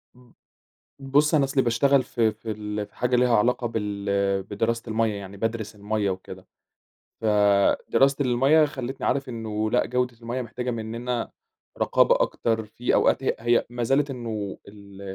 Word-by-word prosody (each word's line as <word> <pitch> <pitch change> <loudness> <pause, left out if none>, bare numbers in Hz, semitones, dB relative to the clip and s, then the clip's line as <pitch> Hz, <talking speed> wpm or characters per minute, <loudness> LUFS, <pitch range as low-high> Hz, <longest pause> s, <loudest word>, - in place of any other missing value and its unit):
امم، 125 -1 -21 0.7
بُص، 140 +3 +2
أنا 145 - +4
أصلي 135 0 +1
باشتغل 130 +3 +3
في 115 -3 +1
في 110 +1 -7
ال 105 0 -4
في - - -30
حاجة 125 0 +1
ليها 125 -1 +3
علاقة 120 +2 +1
بال 100 -2 -1
بدراسة 115 +4 -2
المَيّة، 110 -1 0
يعني 100 0 -8
بادرس 115 0 -3
المَيّة 105 0 -1
وكده. 95 0 -7 0.7
فدراسة 105 +6 +3
المَيّة 135 +6 +4
خلّتني 135 -3 -4
عارف 135 0 0
إنه 110 -2 -3
لأ، 125 - +2
جودة 125 -1 -1
المَيّة 120 +2 -3
محتاجة 125 +1 -4
مننا 115 +1 -4 0.5
رقابة - - +3
أكتر، 110 -2 0
في 120 +3 -2
أوقات 135 - +3
هي - - +1
هي 120 +1 +2
ما 120 0 -4
زالت 135 +4 +2
إنه 110 -6 -5
ال 100 -1 -13
115 Hz, 155 wpm, -25 LUFS, 105-125 Hz, 0.7 s, أنا